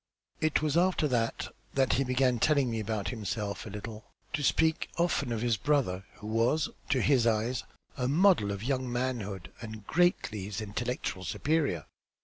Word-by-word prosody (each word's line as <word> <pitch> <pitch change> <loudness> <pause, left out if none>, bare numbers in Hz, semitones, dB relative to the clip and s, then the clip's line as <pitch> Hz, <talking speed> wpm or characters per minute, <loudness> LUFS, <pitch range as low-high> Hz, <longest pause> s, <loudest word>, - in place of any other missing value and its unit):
It 155 -1 +1
was 155 +1 +1
after 175 -3 +3
that 115 -2 0 0.3
that 135 -2 +3
he 135 - +2
began 130 -1 +2
telling 140 -2 +3
me 115 - -1
about 110 -1 -2
himself 105 -2 -3
a - - -6
little; 105 +2 -7 0.3
to 155 - 0
speak 160 +2 +2
often 170 -7 +1
of 115 0 -1
his 120 -3 +2
brother, 110 -10 +1
who - - -12
was, 115 +8 +2 0.2
to 130 - +2
his 130 -5 +4
eyes, 115 +3 +1 0.3
a 125 - 0
model 165 - +4
of 100 +1 -4
young 130 -1 -1
manhood 105 -8 -3
and 110 -2 -8
greatly 160 - +1
his 100 0 -4
intellectual 110 -2 -3
superior." 135 - 0
120 Hz, 165 wpm, -30 LUFS, 105-140 Hz, 0.3 s, his